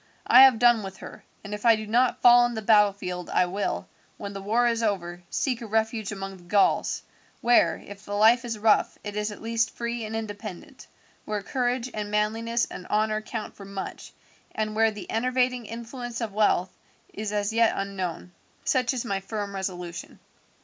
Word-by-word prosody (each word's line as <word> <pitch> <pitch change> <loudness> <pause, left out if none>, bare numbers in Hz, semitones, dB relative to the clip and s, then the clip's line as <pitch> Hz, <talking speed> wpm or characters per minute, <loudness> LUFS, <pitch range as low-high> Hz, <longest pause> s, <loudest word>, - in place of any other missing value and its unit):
I 255 - +8
have 265 -3 +8
done 240 -1 +5
with 190 -1 -8
her; - - -11 0.2
and 205 0 -7
if 210 - -6
I 230 -2 +6
do 215 0 -5
not 240 +4 +1
fall 245 0 +8
in 240 - -6
the 220 - -4
battlefield 200 -4 +2
I 180 - +3
will, 195 +3 -3 0.3
when 200 -1 -6
the 195 - -6
war 225 +5 +2
is 230 -1 +1
over, 180 -5 -2
seek 250 -4 -1
a 230 - -6
refuge 220 0 -1
among 195 -1 -6
the 175 - -18
Gauls, 195 +3 +2 0.4
where, 240 0 +4
if 200 0 -11
the 205 -1 -5
life 225 +4 +5
is 230 -2 -4
rough, 215 0 +2
it 205 -1 -6
is 210 0 -1
at 210 - -11
least 230 0 0
free 235 0 -3
and 220 +1 -5
independent, 215 - -7 0.4
where 210 -2 -3
courage 250 0 -1
and 210 -1 -4
manliness 225 +3 0
and 180 - -9
honour 215 0 +1
count 215 0 -6
for 200 - -11
much, 195 -1 -7 0.4
and 215 -1 -2
where 225 0 +4
the 210 -2 -8
enervating 250 0 0
influence 235 +1 -6
of 225 -4 -4
wealth 195 -3 +1 0.4
is 210 0 -4
as 205 +1 -1
yet 230 0 +4
unknown. 190 -3 -4 0.3
Such 255 0 +1
is 245 - -3
my 195 -4 -1
firm 205 0 -5
resolution." 180 -3 -6
215 Hz, 190 wpm, -26 LUFS, 200-235 Hz, 0.4 s, I